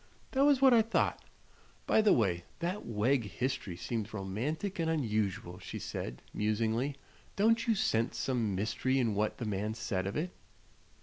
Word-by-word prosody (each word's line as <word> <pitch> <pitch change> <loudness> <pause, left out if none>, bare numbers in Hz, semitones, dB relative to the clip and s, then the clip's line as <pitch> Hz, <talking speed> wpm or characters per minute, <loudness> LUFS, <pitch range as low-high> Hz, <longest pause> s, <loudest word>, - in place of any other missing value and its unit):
"That 275 +1 +3
was 280 -2 +4
what 265 -2 +8
I 230 - +7
thought. 225 +1 0 0.6
By - - +4
the 215 - +5
way, 90 -7 +2
that 180 +4 -3
Wegg 115 +3 +1
history 125 -5 -3
seems 110 +1 -3
both 110 - -10
romantic 135 - -3
and 165 -1 +1
unusual," 105 - -1
she - - -6
said, - - -5
musingly. 110 +6 0 0.4
"Don't 225 +3 +3
you 225 - +4
scent 115 - +1
some 115 -4 0
mystery 110 +6 0
in 120 -5 +2
what 105 +1 0
the 120 - -4
man 105 +1 -2
said 95 -5 -2
of 100 - -3
it?" 175 +4 -2
115 Hz, 170 wpm, -32 LUFS, 105-165 Hz, 0.6 s, what